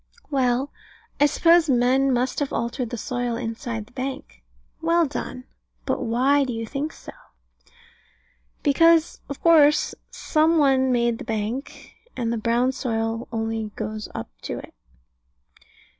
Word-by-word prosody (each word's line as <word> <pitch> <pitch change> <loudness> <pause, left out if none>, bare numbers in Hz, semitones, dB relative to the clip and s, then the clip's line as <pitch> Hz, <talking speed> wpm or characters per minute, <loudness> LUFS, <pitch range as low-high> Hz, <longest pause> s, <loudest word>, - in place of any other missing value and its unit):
Well, 260 0 +1 0.5
I 290 - +6
suppose 335 +2 +4
men 260 +2 +3
must 250 +1 0
have 285 -2 -2
altered 235 +1 -2
the 240 - -5
soil 245 +1 -2
inside 225 -1 -4
the 240 - -23
bank. 255 - -6 0.4
Well 335 +1 +3
done. 260 -3 -5 0.4
But - - -1
why 265 +5 +2
do 255 -2 -3
you 225 0 -4
think 285 +6 -3
so? - - -11 1.5
Because, 330 +3 +4
of 280 - -6
course, 305 -3 +5 0.2
some 320 +1 +1
one 265 -3 +3
made 235 -1 +1
the - - -6
bank; 225 +5 -4 0.2
and 235 -2 -1
the - - -1
brown 235 +3 +1
soil 225 -2 -2
only 225 -1 -2
goes 215 0 -5
up 110 - -6
to - - -5
it. - - -10
250 Hz, 140 wpm, -24 LUFS, 230-285 Hz, 1.5 s, I